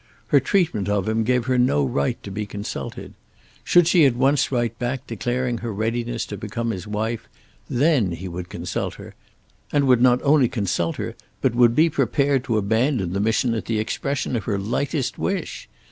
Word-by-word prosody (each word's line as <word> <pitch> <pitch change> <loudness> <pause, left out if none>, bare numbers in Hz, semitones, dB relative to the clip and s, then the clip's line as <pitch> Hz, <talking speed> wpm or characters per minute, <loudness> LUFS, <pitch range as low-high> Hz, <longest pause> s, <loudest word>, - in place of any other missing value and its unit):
Her - - +6
treatment 160 - 0
of 100 -1 0
him 110 +1 +1
gave 125 +1 +1
her 130 -1 +1
no 75 - +3
right 70 +2 0
to 100 - -7
be 105 +1 -4
consulted. 100 0 -6 0.5
Should 175 -2 +5
she 170 -2 +5
at 125 - 0
once 135 +3 +2
write 120 -3 -1
back 125 +1 -3
declaring 120 +2 -2
her 115 -1 -4
readiness 115 +3 -2
to 105 - -7
become 115 +3 -3
his 95 -2 -6
wife, 110 +2 -3 0.4
then 125 - +2
he 90 +3 -6
would 90 0 -6
consult - - -4
her, - - -11 0.6
and 145 -1 +2
would 125 -2 +4
not 125 0 +5
only 140 -4 +4
consult 95 -6 -1
her - - -4 0.3
but 130 - +1
would 120 -1 +4
be 160 +2 +5
prepared 140 -2 +1
to 115 - 0
abandon 110 - +1
the 100 - -1
mission 110 +3 +1
at 110 - -3
the 115 - -1
expression 135 +5 -2
of 110 - -3
her 105 - 0
lightest 130 - -2
wish. - - -3
115 Hz, 190 wpm, -23 LUFS, 105-130 Hz, 0.6 s, Her